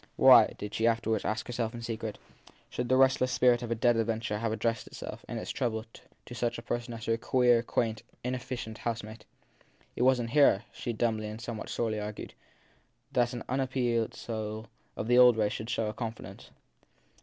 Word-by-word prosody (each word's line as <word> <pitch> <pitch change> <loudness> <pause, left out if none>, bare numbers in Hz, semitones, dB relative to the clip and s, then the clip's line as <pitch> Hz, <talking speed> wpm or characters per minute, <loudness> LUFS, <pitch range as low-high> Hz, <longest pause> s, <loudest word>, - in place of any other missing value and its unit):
Why, - - +8 0.2
she 110 +1 +1
afterwards 115 -1 0
asked 110 0 -1
herself 120 -1 -3
in 120 - -7
secret, 115 -2 -4 0.5
should 125 0 -3
the 130 - +4
restless 130 -1 +4
spirit 125 -1 +4
of 120 - -5
a 115 - 0
dead 120 +1 +3
adventurer 110 -1 -1
have 115 0 -1
addressed 115 +1 -1
itself, - - -8
in - - -4
its - - -4
trouble, 110 -2 -2 0.4
to - - -9
such 120 0 -1
a 115 - -8
person 120 0 -3
as 115 - -8
her 115 0 +1
queer, 120 0 +3
quaint, 115 -2 -1 0.2
inefficient 125 -3 -4
housemate? 115 -1 -5 0.7
It - - -3
was 130 0 +4
in 115 -1 -3
her, 115 -6 +5
she 120 - -4
dumbly 110 -1 -1
and 105 +1 -7
somewhat 115 -2 -6
sorely 110 -2 -1
argued, 105 0 -6 0.8
that 120 0 +1
an 120 - -5
unappeased 125 -3 0
soul 110 -1 -5 0.3
of 110 - -3
the 125 +1 +5
old 125 -2 +7
race 105 -2 +1
should 110 - -5
show 115 -2 0
a 105 - -3
confidence. 115 -1 -7
115 Hz, 185 wpm, -30 LUFS, 110-120 Hz, 0.8 s, Why